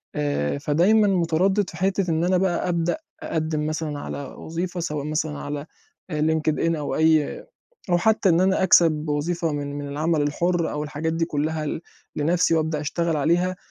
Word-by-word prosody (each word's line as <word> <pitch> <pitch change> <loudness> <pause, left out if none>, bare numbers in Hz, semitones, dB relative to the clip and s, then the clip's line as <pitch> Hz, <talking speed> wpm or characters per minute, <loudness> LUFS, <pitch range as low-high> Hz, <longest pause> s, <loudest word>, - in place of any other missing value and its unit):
آآ، 75 - -1
فدايمًا 180 +9 +3
متردِّد 185 +2 +2
في 165 - -10
حتة 190 -1 0
إن 160 +1 +1
أنا 185 +1 +3
بقى 180 -1 0
أبدأ 170 - 0 0.3
أقدِّم 155 - -1
مثلًا 155 -2 -3
على 140 - -5
وظيفة، 175 +6 -5
سواء 150 -4 -3
مثلًا 150 -1 -2
على 145 0 -5 0.4
آآ، 150 -2 -2
LinkedIn، 160 +1 +1
أو 145 -1 -3
أي 160 -2 +2 0.5
أو 175 - +4
حتى 215 +1 +3
إن 170 0 +4
أنا 190 0 +2
أكسب 160 -4 +4
وظيفة 165 +3 -1
من 145 0 -4
من 145 - -5
العمل 155 +2 0
الحُر، 170 +4 0
أو 150 0 -3
الحاجات 155 +2 -3
دي 165 0 0
كلَّها 155 0 -2
ل 145 - -3 0.4
لنفسي، 165 +2 +2
وأبدأ 160 -1 0
أشتغل 165 +2 -1
عليها. 175 +5 +1
160 Hz, 170 wpm, -24 LUFS, 150-175 Hz, 0.5 s, أو